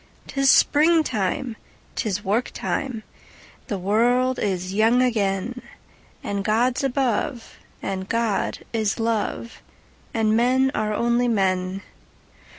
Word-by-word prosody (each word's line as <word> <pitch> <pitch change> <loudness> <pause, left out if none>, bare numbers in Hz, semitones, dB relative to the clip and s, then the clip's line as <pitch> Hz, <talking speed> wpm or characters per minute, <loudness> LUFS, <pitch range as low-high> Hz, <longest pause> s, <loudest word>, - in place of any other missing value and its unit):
'Tis 275 0 +1
springtime! 270 - +3 0.4
'Tis 205 -2 -2
work 215 +6 0
time! 245 -5 -3 0.6
The 205 - -2
world 245 +7 +2
is 185 -2 -2
young 225 +4 +4
again! 220 0 -1 0.6
And 200 -1 -2
God's 240 +6 +1
above, 260 -1 -1 0.3
and 190 0 -4
God 230 -3 -1
is 220 -1 0
love, 230 0 -2 0.5
And 220 -1 +1
men 260 +3 +3
are 215 0 -1
only 235 +3 +1
men. 190 -3 0
225 Hz, 105 wpm, -23 LUFS, 200-250 Hz, 0.6 s, young